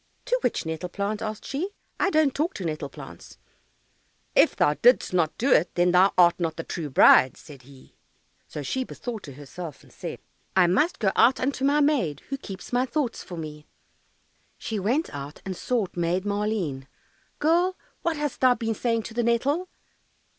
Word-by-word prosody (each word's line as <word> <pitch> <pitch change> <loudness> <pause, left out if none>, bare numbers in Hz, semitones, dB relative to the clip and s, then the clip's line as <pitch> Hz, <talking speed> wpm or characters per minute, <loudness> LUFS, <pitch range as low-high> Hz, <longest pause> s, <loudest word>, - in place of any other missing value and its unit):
"To - - +1
which - - -1
nettle 160 +2 -4
plant?" 205 +3 -3
asked 215 -1 -5
she; 310 +8 -3 0.3
"I - - +3
don't 310 -5 +3
talk 320 +5 -1
to 190 - -5
nettle 155 -3 -3
plants." - - -12 1.0
"If - - +5
thou 150 - +3
didst 245 +4 +3
not 165 -3 +1
do 260 +4 +1
it, 175 -4 +3
then 175 0 +3
thou 185 +2 +5
art 175 -1 +5
not 165 -2 -1
the 165 - -4
true 160 -3 -5
bride," 130 0 +6
said 145 -4 -13
he. 130 +1 -17 0.5
So 150 - -6
she 260 - -1
bethought 235 -7 -7
herself, 145 +3 -9
and - - -20
said, - - -6 0.4
"I 185 -2 +6
must 195 - +2
go 195 -4 +1
out 245 +3 +5
unto 265 0 -1
my 290 +2 +3
maid, 245 - +1
Who 275 - -2
keeps 195 -1 -9
my 250 +1 +2
thoughts 260 -3 -2
for 175 - -9
me." 150 -2 -8 0.9
She 220 -2 -4
went 245 - 0
out 145 +1 -7
and 190 -1 -4
sought 225 -1 -2
Maid 175 +2 0
Maleen. 200 -10 -2 0.5
"Girl, 345 +5 +2 0.2
what 335 -2 -1
hast 295 -2 -3
thou 255 -1 +5
been 225 -2 -2
saying 230 +1 -1
to 225 - -8
the 240 - 0
nettle?" 270 +10 +1
210 Hz, 180 wpm, -25 LUFS, 165-260 Hz, 1.0 s, bride